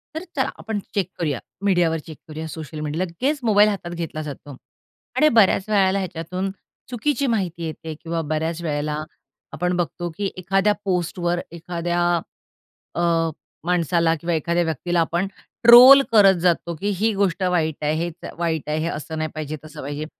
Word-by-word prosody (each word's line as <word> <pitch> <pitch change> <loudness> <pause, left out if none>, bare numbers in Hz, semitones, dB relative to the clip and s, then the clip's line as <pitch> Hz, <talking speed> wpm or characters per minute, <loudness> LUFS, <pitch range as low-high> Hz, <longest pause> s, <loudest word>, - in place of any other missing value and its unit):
तर 320 - -4
चला - - +1
आपण 220 -2 -4 0.2
चेक 190 -3 0
करूया, 150 -7 -1 0.3
मीडियावर 175 -4 +3
चेक 160 -2 -9
करूया, 160 +1 -6
सोशल 155 -1 -7
मीडि 150 +1 -3
लगेच 185 - -1
मोबाईल 210 -2 +5
हातात 190 -4 -4
घेतला 165 -2 -4
जातो 145 -2 -8 0.6
आणि 305 - +6
बऱ्याच 215 -4 +3
वेळेला 195 -2 +3
ह्याच्यातून 185 +1 -4 0.4
चुकीची 280 +3 0
माहिती 185 -8 -1
येते. 160 0 -5
किंवा 165 0 -2
बऱ्याच 160 +2 -2
वेळेला 150 -1 -2 0.5
आपण 180 +2 -1
बघतो 175 0 -2
की 200 -1 -2
एखाद्या 195 +3 +2
पोस्टवर 175 -1 -1
एखाद्या 175 +1 -3 0.9
अ, 170 - 0 0.6
माणसाला 170 -1 +2
किंवा 170 0 -1
एखाद्या 170 +2 +1
व्यक्तीला 170 +2 -1
आपण 170 +3 0 0.4
ट्रोल 250 +4 +10
करत 200 -4 +7
जातो, 170 -1 +1
की 195 +6 -4
ही 220 +1 +2
गोष्ट 195 -2 0
वाईट 160 -5 0
आहे, 150 +1 +1
हे 170 +2 -1 0.3
वाईट 160 -3 -2
आहे, 150 - 0
हे 160 - -1
असं 160 +1 -5
नाही 155 0 -2
पाहिजे, 155 -1 -4
तसं 155 - -9
पाहिजे 145 +2 -4
170 Hz, 160 wpm, -22 LUFS, 160-195 Hz, 0.9 s, ट्रोल